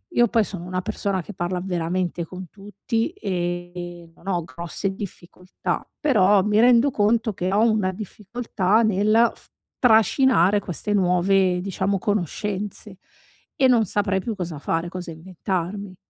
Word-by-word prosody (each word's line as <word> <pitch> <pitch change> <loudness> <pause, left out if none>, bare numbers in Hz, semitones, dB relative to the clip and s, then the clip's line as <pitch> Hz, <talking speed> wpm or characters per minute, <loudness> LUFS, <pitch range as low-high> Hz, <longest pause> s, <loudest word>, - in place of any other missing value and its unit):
io 240 0 +5
poi 225 -1 +2
sono 190 -4 -5
una 185 0 -2
persona 190 0 -2
che 210 - -10
parla 180 0 -2
veramente 175 -1 -2
con 185 +2 -9
tutti, 210 +5 -3
e 175 - -4
non 195 - -18
ho 175 -3 0
grosse 170 +7 -3
difficoltà. 180 -2 -5
Però 210 - +4
mi 210 +2 +1
rendo 245 +2 +5
conto 220 -1 +1
che 180 0 -2
ho 215 +4 +4
una 210 -4 +1
difficoltà 210 +1 -1
nel 215 +2 +3
f - - -17 0.3
trascinare 220 - +4
queste 200 +4 -3
nuove, 185 -1 +3
diciamo, 195 +1 -1
conoscenze, 205 +1 -3 0.6
e 265 - +5
non 240 -3 +4
saprei 195 -1 0
più 230 0 -4
cosa 175 -5 -5
fare, 165 +4 -2
cosa 180 -1 -6
inventarmi. 185 +3 -4
195 Hz, 140 wpm, -23 LUFS, 180-215 Hz, 0.6 s, io